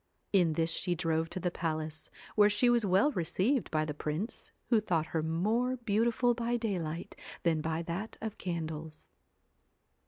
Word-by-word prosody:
In 175 -5 +4
this 165 +1 +1
she 180 +1 0
drove 165 -1 0
to 185 - -3
the 180 0 -1
palace, 155 -2 -3 0.3
where 210 -1 +6
she 240 +4 +4
was 240 -1 +3
well 195 +8 +4
received 205 - 0
by 155 -1 +1
the 150 - -3
prince, 155 +9 -4 0.2
who 230 -3 +4
thought 170 -6 +1
her 160 - +2
more 215 +11 +1
beautiful 235 +2 +2
by 240 0 0
daylight 175 -8 -3 0.3
than 160 -2 +2
by 160 +1 -1
that 175 +6 -4
of 220 -1 -5
candles. 160 -3 -5
180 Hz, 160 wpm, -32 LUFS, 160-220 Hz, 0.3 s, where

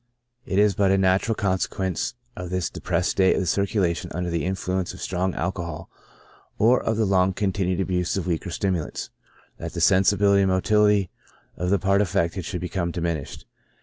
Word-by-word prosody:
It 95 - -1
is 105 0 +4
but 100 +1 +2
a 95 - +4
natural 95 +4 +2
consequence 95 0 -1 0.2
of 90 -1 -6
this 90 -2 -2
depressed - - -1
state 95 -1 +3
of - - 0
the - - -2
circulation 95 -1 0
under 90 0 -2
the 85 -2 -1
influence 95 -1 -2
of - - -12
strong 95 0 -1
alco 90 +1 -2
hol 80 0 -7 0.7
or 120 +4 +4
of 115 - -1
the 110 - +2
long 95 -1 +2
continued 95 -2 -1
abuse 90 -1 -1
of 95 - -2
weaker 90 +1 -2
stimulants, 90 -1 -3 0.5
that - - -6
the - - -4
sensibility 100 +1 +4
and 95 - +2
motility 105 +1 +3 0.4
of 90 +1 -2
the 100 - +3
part 95 +2 +2
affected 85 -2 -1
should 90 -1 -4
become 90 -1 -2
diminished. 85 -4 -4
95 Hz, 180 wpm, -24 LUFS, 90-100 Hz, 0.7 s, is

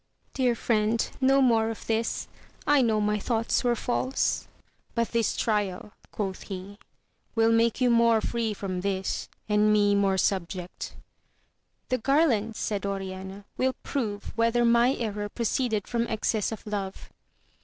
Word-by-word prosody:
— - - -42
Dear 250 -3 +1
Mend, 220 0 +2
no 270 +1 +5
more 225 -3 +3
of 225 - -6
this, 225 0 -1 0.4
I 290 -2 +5
know 220 -3 +2
my 210 0 +1
thoughts 230 +3 0
were 240 -1 +2
false. 255 +2 -1 0.5
But 230 -1 +1
this 230 -1 0
trial, 205 -2 -1 0.2
quoth 195 -3 -3
he, 195 +1 -8 0.6
will 225 0 +4
make 230 +1 +3
you 250 -2 +3
more 235 -1 +5
free 225 -1 -1
from 185 -2 -3
this, 190 -1 -2 0.2
and 210 0 +3
me 205 -1 +4
more 200 -1 +2
subject. 180 -1 -2 0.5
— - - -34
^The 255 - +1
garland, 240 -6 +2
said 205 -2 -2
Oriana, 195 0 -5
will 260 0 +1
prove 210 -7 -3
whether 230 +1 +2
my 235 +2 +4
error 210 -3 -3
proceeded 230 -2 -1
from 235 -1 0
excess 220 -1 0
of 220 - -7
love. 200 -3 -5
220 Hz, 150 wpm, -27 LUFS, 200-235 Hz, 0.6 s, no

